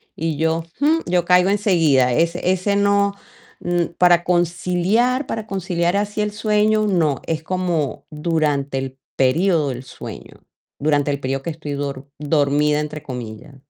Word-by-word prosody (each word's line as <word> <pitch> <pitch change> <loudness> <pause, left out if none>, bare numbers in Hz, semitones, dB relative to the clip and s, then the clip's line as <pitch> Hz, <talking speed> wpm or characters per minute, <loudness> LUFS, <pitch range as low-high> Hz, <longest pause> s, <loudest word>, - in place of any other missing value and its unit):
y 160 -1 -2
yo, 160 +1 0 0.2
jum, 315 +3 +3
yo 175 -1 +1
caigo 180 +1 +4
enseguida, 165 - +3
ese 170 +5 +1
ese 190 +2 +1
no 200 0 +2 0.4
mm, 175 -1 0
para 175 -1 +5
conciliar 180 - +1
para 220 -1 -4
conciliar 185 -2 -1
así 205 +1 -1
el 210 0 -1
sueño 215 0 +1
no, 160 -8 +1
es 160 -1 -2
como 170 -6 -2
durante 150 -3 -1
el 135 0 -5 0.2
periodo 155 +3 +2
del 125 -1 -5
sueño, 130 - -10 0.4
durante 145 0 +1
el 140 - -2
periodo 135 0 -2
que - - -3
estoy 155 -2 -6
dor 140 -1 -5
dormida 150 0 +2
entre 150 0 -5
comillas. 120 0 -8
170 Hz, 150 wpm, -20 LUFS, 145-190 Hz, 0.4 s, para